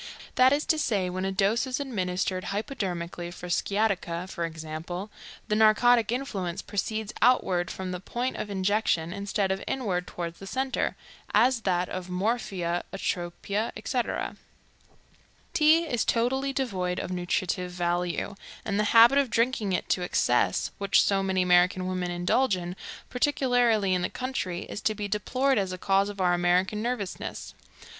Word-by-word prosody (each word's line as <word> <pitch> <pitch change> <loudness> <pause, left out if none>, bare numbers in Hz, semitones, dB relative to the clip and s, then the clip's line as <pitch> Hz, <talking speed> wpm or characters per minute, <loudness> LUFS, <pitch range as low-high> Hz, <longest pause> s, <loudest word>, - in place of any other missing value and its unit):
That 255 +1 +5
is 290 +2 +1
to 315 - +2
say, 195 -10 0
when 185 +1 -2
a 195 - -1
dose 205 +6 +1
is 255 +1 -2
administered 185 -7 -2
hypodermically 180 -6 -3
for 175 0 -9
sciatica, 190 -3 0
for 170 -2 -3
example, 165 +4 -6 0.4
the 210 - +1
narcotic 225 +2 +5
influence 200 -9 -3
proceeds 215 +1 -3
outward 190 -8 +3
from 185 -1 -5
the 180 - -4
point 240 +7 -3
of 210 - -4
injection, 190 -4 0
instead 200 0 -1
of 190 - -2
inward 190 -9 -1
toward 170 -1 -5
the 195 - -10
centers, 265 +5 -1 0.4
as 245 +4 +5
does - - -11
that 180 -1 +1
of 185 0 -6
morphia, 180 -3 -1
atropia, 195 +3 -2
etc. 240 +3 -2 1.2
Tea 315 +2 +5
is 245 -8 0
totally 265 +4 +1
devoid 190 -10 -2
of - - -4
nutritive 180 0 -1
value, 175 +1 -1 0.3
and 200 -2 -1
the 210 - +2
habit 240 +5 +8
of 275 -3 +1
drinking 230 -3 +1
it 180 - -1
to 180 - +1
excess, 120 - +1
which 200 -1 +3
so 195 -1 +2
many 190 -1 +1
American 180 +1 +4
women 185 -1 -2
indulge 180 +6 +1
in, 175 0 -5 0.4
particularly 245 -7 +2
in 180 - +1
the 180 - -1
country, 250 -9 -3
is 205 - -7
to 215 - 0
be 205 0 -3
deplored 255 +5 +1
as 190 -2 -1
a 185 - -4
cause 195 +2 +2
of 205 -1 -8
our 180 -1 +3
American 180 +4 +2
nervousness. 235 -5 -4
195 Hz, 160 wpm, -27 LUFS, 180-230 Hz, 1.2 s, habit